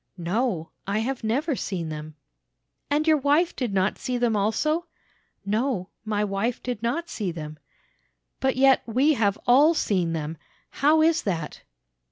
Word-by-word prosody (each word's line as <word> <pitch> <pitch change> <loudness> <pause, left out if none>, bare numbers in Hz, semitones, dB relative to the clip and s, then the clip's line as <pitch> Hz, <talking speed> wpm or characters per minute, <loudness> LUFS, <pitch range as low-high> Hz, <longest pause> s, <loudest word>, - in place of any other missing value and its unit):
"'No, 180 -1 -1 0.2
I 200 +1 0
have 245 +3 -2
never 270 +7 0
seen 175 -8 -4
them.' 155 0 -7 0.7
"'And 295 +2 +1
your 310 -1 +5
wife 295 +5 +2
did 250 -5 -2
not 190 +1 0
see 250 -1 -2
them 240 -2 +1
also?' 305 - 0 0.6
"'No, 215 -2 -1
my 210 -1 -1
wife 210 +4 -2
did 245 -4 -4
not 290 +9 -1
see 205 - -3
them.' 155 -2 -8 0.8
"'But 265 0 +1
yet 265 0 +5
we 260 +7 +3
have 205 -6 +1
all 290 +7 +5
seen 180 - 0
them; 160 0 -4 0.3
how 310 +3 +3
is 325 0 +3
that?' 165 -6 -3
225 Hz, 155 wpm, -25 LUFS, 190-275 Hz, 0.8 s, your